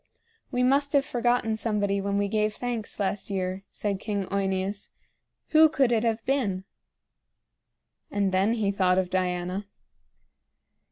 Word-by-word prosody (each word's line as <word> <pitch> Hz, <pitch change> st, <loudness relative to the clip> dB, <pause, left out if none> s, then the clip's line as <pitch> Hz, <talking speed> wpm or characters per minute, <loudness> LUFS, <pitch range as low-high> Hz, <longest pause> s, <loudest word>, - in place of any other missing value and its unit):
"We 250 Hz, -2 st, 0 dB
must 280 Hz, +3 st, +3 dB
have 280 Hz, -1 st, +4 dB
forgotten 240 Hz, -3 st, +1 dB
somebody 205 Hz, -3 st, 0 dB
when 200 Hz, 0 st, -1 dB
we 200 Hz, 0 st, +1 dB
gave 215 Hz, +1 st, 0 dB
thanks 240 Hz, -4 st, -4 dB
last 200 Hz, 0 st, -1 dB
year," 190 Hz, 0 st, -3 dB
said 200 Hz, -2 st, -2 dB
King 205 Hz, -2 st, -2 dB
OEneus. 195 Hz, 0 st, -1 dB, 0.6 s
"Who 315 Hz, 0 st, +7 dB
could 270 Hz, -5 st, +2 dB
it 225 Hz, -1 st, +2 dB
have 225 Hz, -1 st, -1 dB
been?" 215 Hz, -9 st, 0 dB, 1.5 s
And 200 Hz, -1 st, 0 dB
then 190 Hz, +4 st, +2 dB
he 215 Hz, -4 st, 0 dB
thought 185 Hz, -2 st, +2 dB
of 185 Hz, -1 st, 0 dB
Diana. 185 Hz, +1 st, -1 dB
205 Hz, 135 wpm, -27 LUFS, 195-235 Hz, 1.5 s, Who